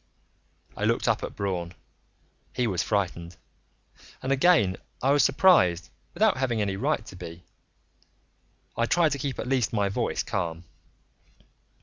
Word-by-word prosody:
I - - -5
looked - - +1
up - - +2
at - - -6
Braun. 90 -3 -3 0.8
He 125 - +1
was 95 -6 0
frightened, 90 -4 -2 0.9
and 130 - -2
again 135 - +3 0.2
I 135 - +2
was 145 -2 +4
surprised 115 - +4 0.2
without 210 -1 +3
having 125 -4 0
any 100 -2 -1
right 95 - -1
to - - -11
be. 85 +2 -9 1.3
I 115 - 0
tried 165 0 +3
to 140 - -2
keep 135 -1 -3
at - - -4
least 125 -3 0
my 100 -2 +1
voice 115 +4 -1
calm. 85 -5 -3
110 Hz, 140 wpm, -26 LUFS, 90-135 Hz, 1.3 s, was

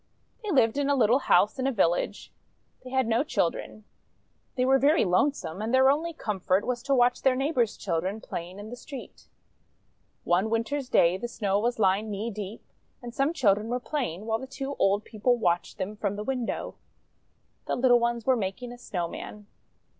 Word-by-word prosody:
They 425 - -5
lived 265 - +3
in 285 0 0
a 285 - +3
little 240 0 +4
house 215 -2 +3
in 260 - 0
a - - +2
village. 175 -7 0 0.5
They 255 - -9
had 260 0 +1
no 230 +3 +2
children. 215 - -2 0.7
They 255 - +1
were 270 +1 +4
very 295 +5 +4
lonesome, 185 - 0
and 220 +2 -2
their 260 +1 +6
only 320 +4 -1
comfort 195 - -1
was 245 -1 -2
to 275 +2 +1
watch 245 0 +3
their 265 -1 +3
neighbour's 255 -5 0
children 185 +3 -2
playing 175 -2 -7
in 210 +2 -9
the - - -5
street. 260 +1 -10 1.0
One 185 +5 +2
Winter's 250 +4 -1
day 170 +2 +4
the 240 - -4
Snow 200 -4 -1
was 240 +3 0
lying 205 +1 +2
knee 210 +3 -3
deep, 210 +1 -7 0.4
and 240 -1 -7
some 275 +5 +1
children 215 -9 +2
were 245 +2 -1
playing, 240 - -3
while 225 0 0
the 265 - -7
two 270 +1 -5
old 200 +2 +2
people 240 +3 +1
watched 175 -6 0
them 195 +2 -4
from 205 -1 -2
the 210 - -4
window. 250 -1 -3 0.9
The - - 0
little 245 -1 +4
ones 235 -1 -1
were 260 - +4
making 230 +3 -4
a 245 - -11
Snow 175 -7 -3
man. 210 +4 -9
230 Hz, 190 wpm, -27 LUFS, 205-260 Hz, 1.0 s, their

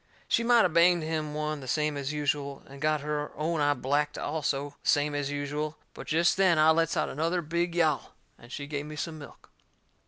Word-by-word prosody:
She 230 - +2
might 235 -1 +5
of 175 - 0
banged 170 0 +5
him 155 -1 -3
one 155 0 -2
the 130 - -9
same 150 +2 0
as 140 0 -3
usual, 145 -2 -2
and 140 0 -13
got 155 -1 +1
her 150 0 -3
own 155 +1 -1
eye 145 0 +3
blacked 145 +3 0
also, 145 -2 -2
the - - -2
same 145 0 +3
as 145 -1 -2
usual; 145 +2 -3 0.2
but - - -10
jest 170 +4 +2
then 185 -4 +4
I 155 +1 +6
lets 165 0 +1
out - - +1
another 165 +4 -1
big 170 +2 -1
yowl, 155 -7 +1 0.2
and 120 - -15
she 145 - -5
give 145 0 -4
me 155 - -7
some 155 +1 -5
milk. 145 - -13
150 Hz, 215 wpm, -28 LUFS, 145-160 Hz, 0.2 s, I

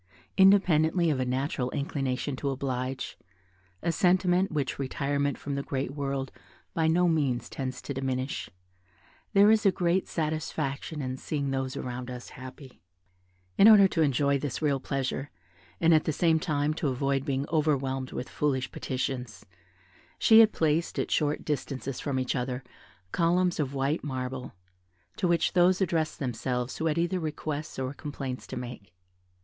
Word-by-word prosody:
Independently 180 -4 +5
of 135 - -1
a 130 - 0
natural 130 0 -1
inclination 135 0 -2
to 140 - -2
oblige, 130 -1 -3 0.6
a 170 - +2
sentiment 180 +1 +3
which 145 -4 -2
retirement 140 +1 -1
from 145 - -5
the 140 - -1
great 135 -1 -3
world 135 -2 -3 0.4
by 160 -1 +1
no 175 +2 +3
means 140 -7 +1
tends 130 -2 -5
to 140 - -4
diminish, 130 0 -3 0.8
there 200 +1 +7
is 220 -1 +4
a 195 - +5
great 180 +1 +1
satisfaction 155 -2 -3
in 130 0 -3
seeing 140 -1 -2
those 135 -1 -2
around 125 0 -5
us 125 -1 -7
happy. 130 - -11 0.8
In 200 - +9
order 205 -3 +9
to 165 - 0
enjoy 140 -1 +2
this 140 -2 -3
real 145 -3 +1
pleasure, 135 +1 -3 0.5
and 165 0 +5
at 155 - +4
the - - +1
same 160 +1 +3
time 150 -1 0
to 155 -1 -2
avoid 135 +1 0
being 135 +1 -1
overwhelmed 135 -4 0
with 125 - -4
foolish 135 -3 -1
petitions, 125 -5 -4 0.7
she 220 0 +7
had 225 -1 +7
placed, 160 +1 0
at - - -1
short 150 -1 0
distances 135 -3 -3
from 140 -2 -2
each 130 0 -1
other, 125 0 -2 0.5
columns 175 +1 +2
of 140 -2 -1
white 140 +4 0
marble, 130 -2 -4 0.6
to 180 - +1
which 170 -1 +2
those 180 0 +4
addressed 165 -4 0
themselves 125 -1 -2
who 160 - 0
had 155 0 0
either 175 +2 +1
requests 155 -1 -4
or 130 0 -3
complaints 140 -3 -6
to - - -6
make. 120 -7 -8
140 Hz, 155 wpm, -28 LUFS, 130-160 Hz, 0.8 s, In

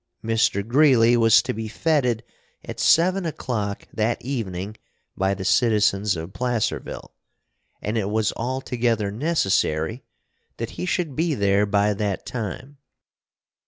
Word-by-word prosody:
Mr. 110 -2 +1
Greeley 120 -3 +5
was 115 -2 +5
to - - -3
be 110 0 -5
fêted 125 -4 +1 0.4
at - - -7
seven 185 +3 +4
o'clock 115 - -3
that 110 +2 0
evening 105 -6 -4 0.4
by 95 +1 0
the 95 0 -6
citizens 105 -3 +2
of 80 +3 -7
Placerville, 120 -3 -3 0.7
and 110 +2 -1
it 100 -1 -2
was 110 0 0
altogether 120 -4 -1
necessary 110 - 0 0.5
that 115 0 -4
he 180 - -5
should 170 -7 -1
be 160 -1 0
there 100 -1 +2
by 105 0 +2
that 100 -1 -3
time. 125 +5 -6
115 Hz, 125 wpm, -23 LUFS, 100-130 Hz, 0.7 s, Greeley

